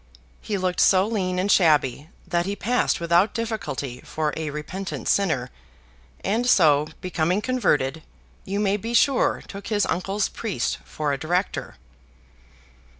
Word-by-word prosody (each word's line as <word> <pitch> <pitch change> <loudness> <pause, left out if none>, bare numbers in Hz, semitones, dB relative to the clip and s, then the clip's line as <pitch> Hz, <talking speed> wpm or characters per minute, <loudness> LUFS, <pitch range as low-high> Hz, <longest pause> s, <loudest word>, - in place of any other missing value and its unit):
He 205 - -2
looked 185 -1 -1
so 190 0 +5
lean 190 -5 -1
and 190 +2 +1
shabby, 150 -4 +3 0.2
that 175 0 0
he 200 - -2
passed 245 +4 0
without 170 +5 +2
difficulty 215 - -4
for 155 -1 -2
a 160 -1 -3
repentant 150 +6 -5
sinner; 160 -11 +1 0.7
and 230 +5 +1
so, 150 -8 +5
becoming 180 +1 0
converted, 165 - 0 0.4
you 200 +2 -3
may 205 -1 +2
be 230 +3 -4
sure 270 +1 +3
took 200 0 -8
his 210 -2 +1
uncle's 195 +3 -1
priest 220 -5 -3
for 150 -2 -2
a 135 - -3
director. 180 +4 -2
185 Hz, 140 wpm, -24 LUFS, 155-205 Hz, 0.7 s, so